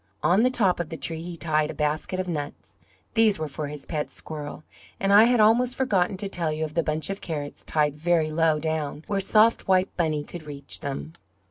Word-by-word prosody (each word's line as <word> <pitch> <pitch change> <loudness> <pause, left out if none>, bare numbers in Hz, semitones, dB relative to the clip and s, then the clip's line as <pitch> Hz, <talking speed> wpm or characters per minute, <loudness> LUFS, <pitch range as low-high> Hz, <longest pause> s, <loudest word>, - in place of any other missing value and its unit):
On 180 +7 +4
the 250 - +4
top 200 -9 +2
of 170 -3 -3
the 165 - -6
tree 160 +2 -2
he 170 0 -7
tied 155 -2 +1
a - - -6
basket 150 +5 -1
of 185 - -2
nuts; 150 -4 -5 0.4
these 225 -3 +4
were 155 - -3
for 145 +1 -5
his 145 -1 -8
pet 150 -3 -3
squirrel; 150 -1 -7 0.4
and 195 +1 +2
I 210 +2 +9
had 245 0 +3
almost 235 +4 +4
forgotten 195 -8 +1
to 200 +1 -3
tell 170 -5 -1
you 155 +1 -2
of 155 -1 -4
the 170 - +2
bunch 155 +3 -2
of 195 - -6
carrots 145 -4 -5
tied 150 -2 0
very 160 0 +1
low 160 -1 +2
down 155 -1 -3
where 200 -2 -1
soft 215 +3 +3
white 185 0 +2
Bunny 155 -4 0
could 175 +3 -9
reach 140 -1 -5
them. 140 +3 -5
165 Hz, 220 wpm, -25 LUFS, 155-195 Hz, 0.4 s, I